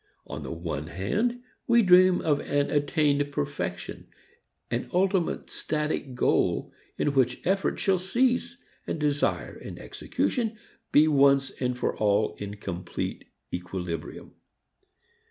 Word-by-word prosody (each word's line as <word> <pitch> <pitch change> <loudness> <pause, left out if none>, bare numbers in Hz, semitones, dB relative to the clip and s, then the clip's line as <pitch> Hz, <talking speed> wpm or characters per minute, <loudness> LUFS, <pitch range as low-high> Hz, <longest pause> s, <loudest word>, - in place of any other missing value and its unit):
On - - -6
the - - -6
one 80 -3 -4
hand, 215 - -1 0.2
we 235 -1 +5
dream 185 -1 +6
of 145 -2 +2
an 145 0 0
attained 145 -1 +2
perfection, 70 - -4 0.6
an 120 +1 -2
ultimate 185 -1 +1
static 150 -4 -2
goal, - - +1 0.2
in 145 - +1
which 130 -3 +1
effort 195 +2 +1
shall 190 -2 +2
cease, 245 +7 +1 0.3
and - - -2
desire 145 -1 0
and - - -9
execution 225 -3 -2 0.3
be 150 +2 +6
once 140 -2 +4
and 125 -1 -2
for - - -1
all 105 -2 +2
in 100 0 -5
complete 90 -3 -5 0.3
equilibrium. 90 -2 -5
145 Hz, 120 wpm, -27 LUFS, -, 0.6 s, dream